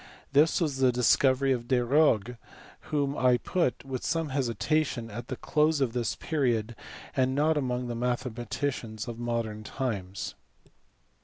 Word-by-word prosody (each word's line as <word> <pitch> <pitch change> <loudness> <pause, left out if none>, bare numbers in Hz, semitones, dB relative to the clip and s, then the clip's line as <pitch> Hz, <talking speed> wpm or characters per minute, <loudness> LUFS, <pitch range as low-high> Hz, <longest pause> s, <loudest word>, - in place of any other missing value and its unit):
This 150 +3 +4
was 150 -6 0
the 130 -1 +4
discovery 130 +2 +3
of 120 -2 -1
Desargues 125 -2 +3 0.5
whom 145 -2 0
I 125 -2 +4
put 135 -1 -1
(with 130 -2 -4
some 165 -2 -1
hesitation) 130 -1 -1
at 120 +3 -7
the 130 - -4
close 150 +3 +1
of 130 -4 0
this 120 -3 -1
period, 120 -7 -1 0.4
and 130 0 +2
not 155 +2 +3
among 125 -3 -1
the 120 - -3
mathematicians 120 -1 -3
of 120 -1 -6
modern 115 -3 -2
times. 100 -7 -4
125 Hz, 140 wpm, -28 LUFS, 120-140 Hz, 0.5 s, This